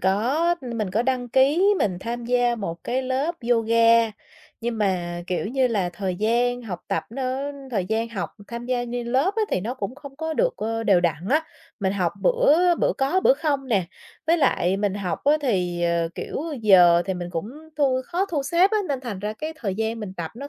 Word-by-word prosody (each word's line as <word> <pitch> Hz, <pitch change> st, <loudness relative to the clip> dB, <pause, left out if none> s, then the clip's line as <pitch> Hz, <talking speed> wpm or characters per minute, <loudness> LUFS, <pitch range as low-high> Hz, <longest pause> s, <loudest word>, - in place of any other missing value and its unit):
có 250 Hz, -, +2 dB
mình 230 Hz, -7 st, -3 dB
có 215 Hz, +5 st, +1 dB
đăng 250 Hz, -1 st, -1 dB
ký 300 Hz, -, +4 dB
mình 185 Hz, -4 st, 0 dB
tham 235 Hz, +2 st, -4 dB
gia 245 Hz, 0 st, +2 dB
một 170 Hz, -7 st, -6 dB
cái 255 Hz, +2 st, -1 dB
lớp 265 Hz, +6 st, -1 dB, 0.2 s
yoga, 230 Hz, 0 st, +4 dB, 0.5 s
nhưng 235 Hz, -1 st, -3 dB
mà, 175 Hz, -4 st, -1 dB
kiểu 180 Hz, +1 st, -2 dB
như 260 Hz, +3 st, +1 dB
là, 200 Hz, -6 st, 0 dB
thời 190 Hz, -1 st, -3 dB
gian 240 Hz, +4 st, +1 dB
học 180 Hz, -6 st, -6 dB
tập 195 Hz, -, -1 dB
nó 265 Hz, +3 st, -3 dB, 0.2 s
thời 200 Hz, -7 st, 0 dB
gian 225 Hz, +3 st, -1 dB
học 210 Hz, -6 st, -4 dB, 0.2 s
tham 235 Hz, 0 st, -6 dB
gia 250 Hz, -1 st, 0 dB
như 240 Hz, 0 st, -4 dB
lớp 265 Hz, +11 st, +1 dB
á, 445 Hz, -, +2 dB
thì -, -, +1 dB
nó 230 Hz, +7 st, -3 dB
cũng 230 Hz, -1 st, -5 dB
không 280 Hz, -1 st, -12 dB
có 320 Hz, +1 st, -3 dB
được, -, -, +1 dB
ơ, 225 Hz, +1 st, -2 dB
đều 195 Hz, -5 st, +4 dB
đặn 170 Hz, +1 st, -1 dB
á. 305 Hz, +3 st, +3 dB, 0.4 s
Mình 190 Hz, -1 st, +1 dB
học 180 Hz, -4 st, 0 dB
bữa 360 Hz, -8 st, +4 dB
bữa -, -, +1 dB
có 275 Hz, +8 st, +2 dB
bữa -, -, +5 dB
không 285 Hz, -, -1 dB
nè, 195 Hz, -6 st, +2 dB, 0.4 s
với 335 Hz, +2 st, +4 dB
lại 190 Hz, -, +2 dB
mình 200 Hz, -1 st, 0 dB
học 195 Hz, -3 st, -4 dB
á, 290 Hz, -, +5 dB
thì, 180 Hz, -9 st, 0 dB
ờ, 170 Hz, -1 st, +1 dB
kiểu, -, -, -5 dB, 0.2 s
giờ 175 Hz, -4 st, +6 dB
thì 190 Hz, -, -1 dB
mình 175 Hz, -1 st, -5 dB
cũng 180 Hz, +8 st, -4 dB, 0.2 s
thu 270 Hz, -3 st, +2 dB
khó 355 Hz, +5 st, -1 dB
thu 310 Hz, -7 st, -2 dB
xếp 345 Hz, +8 st, +3 dB
á, 435 Hz, -, +2 dB
nên 275 Hz, -2 st, -1 dB
thành 235 Hz, -7 st, -5 dB
ra 210 Hz, +2 st, -3 dB
cái 310 Hz, +8 st, -5 dB
thời 200 Hz, -10 st, -3 dB
gian 220 Hz, +2 st, -2 dB
mình 205 Hz, -3 st, -6 dB
tập 165 Hz, -2 st, -4 dB
nó 280 Hz, +3 st, -7 dB
235 Hz, 215 wpm, -24 LUFS, 195-275 Hz, 0.5 s, giờ